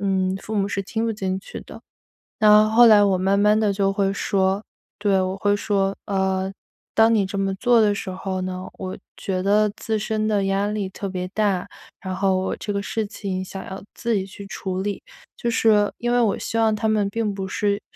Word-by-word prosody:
嗯， 190 Hz, -1 st, 0 dB
父 220 Hz, -, -5 dB
母 200 Hz, -1 st, +1 dB
是 200 Hz, -1 st, -2 dB
听 225 Hz, +3 st, -3 dB
不 225 Hz, -, 0 dB
进 190 Hz, -2 st, -2 dB
去 195 Hz, -, -9 dB
的。 -, -, -12 dB, 0.6 s
那 215 Hz, 0 st, +7 dB
后 235 Hz, +2 st, +7 dB
来 210 Hz, -2 st, +7 dB
我 195 Hz, -2 st, +3 dB
慢 195 Hz, +2 st, +1 dB
慢 210 Hz, +1 st, +4 dB
地 210 Hz, -2 st, +2 dB
就 195 Hz, 0 st, +1 dB
会 195 Hz, -1 st, +1 dB
说 195 Hz, +1 st, 0 dB, 0.4 s
对， 200 Hz, -2 st, +2 dB
我 185 Hz, +1 st, -2 dB
会 205 Hz, +1 st, +1 dB
说： 200 Hz, -1 st, 0 dB
“呃， 190 Hz, -1 st, 0 dB, 0.4 s
当 225 Hz, +1 st, +5 dB
你 205 Hz, -3 st, +3 dB
这 200 Hz, +1 st, -4 dB
么 195 Hz, 0 st, 0 dB
做 240 Hz, +3 st, +3 dB
的 205 Hz, -1 st, +3 dB
时 195 Hz, -, -5 dB
候 185 Hz, 0 st, -4 dB
呢， 185 Hz, 0 st, -4 dB
我 185 Hz, -1 st, -6 dB, 0.2 s
觉 185 Hz, -2 st, -2 dB
得 205 Hz, +2 st, +3 dB
自 220 Hz, -1 st, -2 dB
身 215 Hz, 0 st, -1 dB
的 205 Hz, -2 st, +1 dB
压 195 Hz, +1 st, +1 dB
力 210 Hz, -2 st, -2 dB
特 195 Hz, +1 st, -6 dB
别 185 Hz, -1 st, -4 dB
大， 200 Hz, -3 st, 0 dB, 0.3 s
然 185 Hz, -1 st, -5 dB
后 195 Hz, -1 st, +2 dB
我 190 Hz, -, -2 dB
这 205 Hz, -, -4 dB
个 200 Hz, 0 st, -2 dB
事 220 Hz, 0 st, -2 dB
情 195 Hz, -3 st, -4 dB
想 190 Hz, +1 st, -8 dB
要 190 Hz, 0 st, -7 dB
自 235 Hz, -1 st, -1 dB
己 190 Hz, -, -2 dB
去 200 Hz, +1 st, -10 dB
处 190 Hz, -1 st, -4 dB
理。” 205 Hz, 0 st, -3 dB, 0.4 s
就 240 Hz, -, -3 dB
是 215 Hz, -3 st, +3 dB
因 240 Hz, 0 st, -1 dB
为 245 Hz, -, +3 dB
我 215 Hz, -4 st, +2 dB
希 230 Hz, -, -3 dB
望 220 Hz, -1 st, +3 dB
他 220 Hz, +1 st, -1 dB
们 210 Hz, -2 st, +2 dB
并 215 Hz, 0 st, -1 dB
不 195 Hz, -1 st, -4 dB
是 205 Hz, -1 st, 0 dB
200 Hz, 235 characters per minute, -23 LUFS, 190-215 Hz, 0.6 s, 那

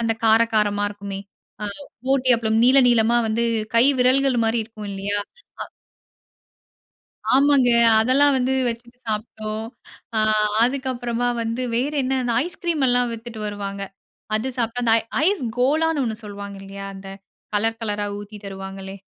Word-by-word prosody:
அந்த 230 Hz, -1 st, +1 dB
கார 225 Hz, +1 st, +6 dB
காரமா 205 Hz, -1 st, +2 dB
இருக்குமே! 200 Hz, -1 st, -7 dB, 0.4 s
அ -, -, -2 dB, 0.4 s
ஊட்டி 265 Hz, -1 st, +2 dB
அப்பளம், 220 Hz, -1 st, +1 dB
நீள 260 Hz, +2 st, +6 dB
நீளமா 235 Hz, 0 st, +3 dB
வந்து 225 Hz, +2 st, 0 dB, 0.3 s
கை 230 Hz, -, +6 dB, 0.2 s
விரல்கள்மாரி 250 Hz, -3 st, +3 dB
இருக்கும் 215 Hz, -2 st, -9 dB
இல்லயா! 200 Hz, +1 st, -2 dB, 0.5 s
அ. -, -, -8 dB, 1.7 s
ஆமாங்க. 275 Hz, -1 st, +4 dB, 0.3 s
அதெல்லாம் 275 Hz, +5 st, +4 dB
வந்து 260 Hz, 0 st, +1 dB, 0.2 s
வச்சுட்டு 235 Hz, +1 st, -6 dB
சாப்பிட்டோம். 215 Hz, 0 st, -4 dB, 0.5 s
ஆ, -, -, +3 dB, 0.5 s
அதுக்கப்பறமா 245 Hz, -2 st, -1 dB
வந்து 230 Hz, +2 st, -2 dB
வேற 265 Hz, +5 st, 0 dB
என்ன 265 Hz, +1 st, 0 dB
அந்த 240 Hz, -2 st, -1 dB
ஐஸ் 350 Hz, -, -8 dB
கிரீம் 330 Hz, -5 st, +1 dB
எல்லாம் 245 Hz, 0 st, +2 dB
வித்துட்டு 230 Hz, -1 st, -8 dB
வருவாங்க. 200 Hz, -1 st, -5 dB, 0.5 s
அது 225 Hz, +5 st, -2 dB
சாப்பிட்டா 235 Hz, +1 st, -1 dB
அந்த 225 Hz, -, +3 dB
ஐ -, -, -6 dB, 0.2 s
ஐஸ் 395 Hz, -4 st, +1 dB, 0.2 s
கோலான்னு 305 Hz, +4 st, +2 dB
ஒண்ணு 220 Hz, -2 st, -3 dB
சொல்லுவாங்க 200 Hz, -1 st, -8 dB
இல்லயா! 195 Hz, 0 st, -8 dB
அந்த 195 Hz, 0 st, -10 dB, 0.5 s
கலர் 225 Hz, +2 st, +1 dB
கலரா 210 Hz, -2 st, -2 dB
ஊத்தி 205 Hz, +1 st, -10 dB
தருவாங்களே! 195 Hz, 0 st, -7 dB
230 Hz, 140 wpm, -22 LUFS, 210-255 Hz, 1.7 s, கார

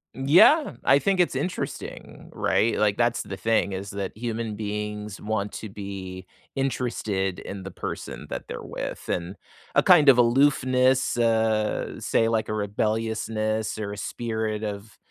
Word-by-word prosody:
Yeah. 170 Hz, -, +5 dB
I 140 Hz, -, +6 dB
think 195 Hz, +1 st, +1 dB
it's 175 Hz, -, +2 dB
interesting, 180 Hz, -, -5 dB
right? 115 Hz, -, +1 dB
Like, 105 Hz, -1 st, +2 dB
that's 120 Hz, 0 st, +1 dB
the 95 Hz, -, -6 dB
thing 100 Hz, 0 st, +1 dB
is 95 Hz, +1 st, -5 dB
that 100 Hz, +1 st, -5 dB
human 115 Hz, -2 st, -3 dB
beings 105 Hz, -1 st, -4 dB
want 105 Hz, -1 st, -2 dB
to 110 Hz, -, -6 dB
be 95 Hz, -2 st, -7 dB, 0.3 s
interested 110 Hz, -8 st, -1 dB
in 95 Hz, -1 st, -7 dB
the 95 Hz, -, -7 dB
person -, -, -6 dB
that -, -, -5 dB
they're -, -, -6 dB
with -, -, -6 dB
and 90 Hz, +2 st, -2 dB, 0.4 s
a -, -, +4 dB
kind 175 Hz, -5 st, +6 dB
of 135 Hz, -3 st, +8 dB
aloofness, 130 Hz, 0 st, +3 dB
uh, 110 Hz, -2 st, +1 dB
say, 115 Hz, -, +1 dB
like, 110 Hz, -1 st, 0 dB
a -, -, -2 dB
rebelliousness 110 Hz, +1 st, -1 dB
or 105 Hz, -1 st, -4 dB
a 105 Hz, -, -6 dB
spirit 110 Hz, -1 st, -3 dB
of, 105 Hz, 0 st, -6 dB
110 Hz, 150 wpm, -25 LUFS, 100-120 Hz, 0.4 s, of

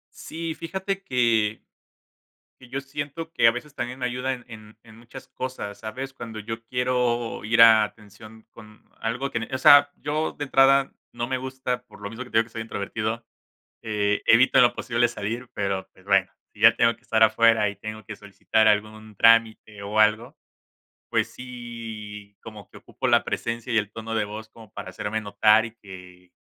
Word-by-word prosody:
Sí, 165 Hz, 0 st, -5 dB
fíjate 190 Hz, +3 st, -4 dB
que 115 Hz, -4 st, +1 dB, 1.0 s
que 125 Hz, -, -15 dB
yo 135 Hz, +1 st, -4 dB
siento 145 Hz, +4 st, -6 dB
que 115 Hz, -, +4 dB
a -, -, +6 dB
veces 130 Hz, +5 st, -8 dB
también 125 Hz, +1 st, -5 dB
ayuda 125 Hz, +2 st, -1 dB
en 125 Hz, -2 st, -10 dB
en 110 Hz, -2 st, -13 dB
en 110 Hz, -1 st, -16 dB
muchas 120 Hz, +3 st, -12 dB
cosas, 115 Hz, -6 st, -6 dB
¿sabes? 130 Hz, +5 st, -6 dB
Cuando 115 Hz, -4 st, -8 dB
yo 115 Hz, +1 st, -6 dB
quiero 125 Hz, -2 st, -1 dB
ir 115 Hz, +2 st, +3 dB
a 110 Hz, -2 st, +8 dB
atención 110 Hz, +1 st, -11 dB
con 105 Hz, -1 st, -16 dB, 0.2 s
algo 120 Hz, +5 st, -3 dB
que -, -, -1 dB
en -, -, -4 dB
eh, -, -, -20 dB
o 130 Hz, -, 0 dB
sea, 145 Hz, +2 st, +7 dB
yo 155 Hz, +2 st, -2 dB
de 145 Hz, -, -5 dB
entrada 135 Hz, 0 st, +4 dB, 0.2 s
no 120 Hz, 0 st, -4 dB
me 130 Hz, 0 st, -1 dB
gusta, 130 Hz, -1 st, -4 dB
por -, -, -17 dB
lo 100 Hz, -, -5 dB
mismo 115 Hz, +3 st, -7 dB
que 125 Hz, -, -15 dB
te -, -, +1 dB
digo 115 Hz, -, +4 dB
que -, -, -19 dB
soy 110 Hz, -, -5 dB
introvertido, 110 Hz, +1 st, -4 dB, 0.6 s
eh, 105 Hz, -1 st, -1 dB
evito 120 Hz, +3 st, +5 dB
en -, -, +8 dB
lo 120 Hz, -, +2 dB
posible 120 Hz, -1 st, 0 dB
salir, 115 Hz, +3 st, -5 dB
pero, 100 Hz, -2 st, -2 dB
pues, -, -, -22 dB
bueno, -, -, +2 dB, 0.2 s
si -, -, -18 dB
ya -, -, +7 dB
tengo 115 Hz, 0 st, +3 dB
que 115 Hz, -, -32 dB
estar 110 Hz, -3 st, +1 dB
afuera 110 Hz, 0 st, +4 dB
y 100 Hz, -, -7 dB
tengo 110 Hz, +2 st, -8 dB
que 110 Hz, 0 st, -8 dB
solicitar 105 Hz, +2 st, 0 dB
algún 110 Hz, 0 st, 0 dB
trámite 110 Hz, -1 st, +3 dB
o 105 Hz, +2 st, -3 dB
algo, 110 Hz, +6 st, +2 dB, 0.7 s
pues -, -, 0 dB
sí, 115 Hz, -5 st, -9 dB
como 105 Hz, -3 st, -11 dB
que -, -, -14 dB
ocupo -, -, -5 dB
la -, -, +4 dB
presencia 115 Hz, +1 st, -4 dB
y 115 Hz, -, +3 dB
el 105 Hz, -1 st, -2 dB
tono 115 Hz, 0 st, -6 dB
de 110 Hz, -1 st, +1 dB
voz 110 Hz, +1 st, -8 dB
como 110 Hz, -2 st, -16 dB
para 95 Hz, -, -7 dB
hacerme 105 Hz, +4 st, -3 dB
notar 105 Hz, +1 st, +3 dB
y 115 Hz, -, -11 dB
que, 90 Hz, -3 st, -14 dB
115 Hz, 195 wpm, -24 LUFS, 110-125 Hz, 1.0 s, a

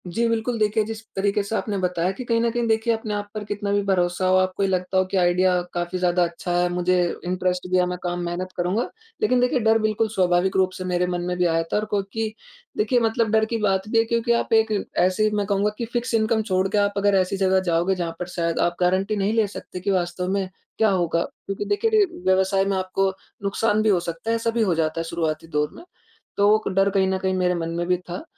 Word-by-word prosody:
जी, 230 Hz, +7 st, 0 dB
बिल्कुल 230 Hz, +1 st, -1 dB
देखिए 215 Hz, +1 st, +2 dB
जिस 220 Hz, +1 st, -6 dB
तरीक़े 200 Hz, +1 st, +1 dB
से 200 Hz, +3 st, -4 dB
आपने 210 Hz, -2 st, -2 dB
बताया 180 Hz, -1 st, 0 dB
कि 225 Hz, +6 st, -7 dB
कहीं 230 Hz, -1 st, +1 dB
न 235 Hz, -, +2 dB
कहीं 240 Hz, 0 st, -1 dB
देखिए 225 Hz, +1 st, +2 dB
अपने 220 Hz, -1 st, -4 dB
आप 205 Hz, 0 st, -3 dB
पर 215 Hz, -1 st, -4 dB
कितना 205 Hz, 0 st, -3 dB
भी 205 Hz, 0 st, +2 dB
भरोसा 180 Hz, -1 st, +1 dB
हो, 185 Hz, -, +4 dB
आपको 185 Hz, +1 st, 0 dB
ये 195 Hz, -, +1 dB
लगता 185 Hz, 0 st, -1 dB
हो 185 Hz, -, +5 dB
कि 190 Hz, +1 st, -2 dB
आइडिया 180 Hz, 0 st, +3 dB
काफ़ी 175 Hz, +1 st, -2 dB
ज़्यादा 180 Hz, 0 st, +2 dB
अच्छा 175 Hz, +1 st, -3 dB
है, 175 Hz, 0 st, +2 dB
मुझे 180 Hz, +1 st, +1 dB, 0.3 s
इंटरेस्ट 180 Hz, 0 st, -1 dB
भी 185 Hz, -, +3 dB
है 180 Hz, -, +3 dB
मैं 180 Hz, 0 st, -3 dB
काम 175 Hz, 0 st, -2 dB
मेहनत 180 Hz, +2 st, -4 dB
करूँगा। 185 Hz, +6 st, 0 dB, 0.3 s
लेकिन 255 Hz, -, +3 dB
देखिए, 250 Hz, 0 st, +2 dB
डर 220 Hz, 0 st, +4 dB
बिल्कुल 215 Hz, +1 st, +1 dB
स्वाभाविक 185 Hz, -2 st, +1 dB
रूप 190 Hz, -1 st, +3 dB
से 185 Hz, -, -5 dB
मेरे 180 Hz, 0 st, 0 dB
मन 175 Hz, -1 st, -2 dB
में 180 Hz, 0 st, -2 dB
भी 180 Hz, -, +2 dB
आया 165 Hz, -1 st, +2 dB
था -, -, +3 dB
और 210 Hz, -, -1 dB
क्योंकि 210 Hz, +2 st, -2 dB, 0.4 s
देखिए, 220 Hz, +4 st, +2 dB
मतलब 225 Hz, -1 st, +1 dB
डर 220 Hz, 0 st, +3 dB
की 230 Hz, +1 st, -2 dB
बात 195 Hz, -2 st, 0 dB
भी 225 Hz, -, +1 dB
है -, -, +4 dB
क्योंकि 235 Hz, +1 st, 0 dB
आप 235 Hz, -1 st, +1 dB
एक 220 Hz, 0 st, +4 dB, 0.3 s
ऐसी 185 Hz, +4 st, +3 dB
मैं 205 Hz, -1 st, 0 dB
कहूँगा 200 Hz, +1 st, +1 dB
कि 235 Hz, -, -3 dB
फिक्स 240 Hz, 0 st, -2 dB
इनकम 220 Hz, 0 st, +2 dB
छोड़ 185 Hz, -2 st, +1 dB
के 210 Hz, -, 0 dB
आप 205 Hz, 0 st, +2 dB
अगर 200 Hz, 0 st, +3 dB
ऐसी 185 Hz, +1 st, -1 dB
जगह 190 Hz, 0 st, +3 dB
जाओगे 170 Hz, +3 st, +2 dB
जहाँ 175 Hz, -2 st, -3 dB
पर 180 Hz, -, -4 dB
शायद 170 Hz, -2 st, -2 dB
आप 175 Hz, -, +1 dB
गारंटी 185 Hz, +4 st, +1 dB
नहीं 200 Hz, +1 st, 0 dB
ले 225 Hz, -2 st, +2 dB
सकते 190 Hz, -2 st, -8 dB
कि 200 Hz, +2 st, -1 dB
वास्तव 180 Hz, -1 st, -1 dB
में 195 Hz, -1 st, 0 dB, 0.3 s
क्या 220 Hz, -, +3 dB
होगा? 170 Hz, -3 st, +1 dB
क्योंकि 195 Hz, +1 st, -6 dB
देखिए, 205 Hz, -, +1 dB
रि 430 Hz, -2 st, +5 dB, 0.2 s
व्यवसाय 190 Hz, +1 st, +3 dB
में 195 Hz, -1 st, 0 dB
आपको 190 Hz, +1 st, 0 dB, 0.3 s
नुकसान 210 Hz, +2 st, +1 dB
भी 215 Hz, -, +2 dB
हो 190 Hz, -4 st, +4 dB
सकता 170 Hz, +4 st, -5 dB
है, 230 Hz, -, +2 dB
ऐसा 230 Hz, 0 st, -1 dB
भी 230 Hz, 0 st, 0 dB
हो 190 Hz, -6 st, +2 dB
जाता 160 Hz, 0 st, -1 dB
है -, -, -1 dB
शुरुआती 165 Hz, -1 st, -3 dB
दौर 150 Hz, -2 st, 0 dB
में, -, -, -12 dB, 0.5 s
तो 205 Hz, +1 st, +5 dB
क -, -, -1 dB
डर 195 Hz, 0 st, +4 dB
कहीं 195 Hz, -1 st, +2 dB
न 190 Hz, -, 0 dB
कहीं 190 Hz, 0 st, -1 dB
मेरे 180 Hz, -1 st, +1 dB
मन 165 Hz, -1 st, -3 dB
में 170 Hz, +1 st, -2 dB
भी 180 Hz, 0 st, +2 dB
था। 180 Hz, -, -8 dB
190 Hz, 250 wpm, -23 LUFS, 180-215 Hz, 0.5 s, हो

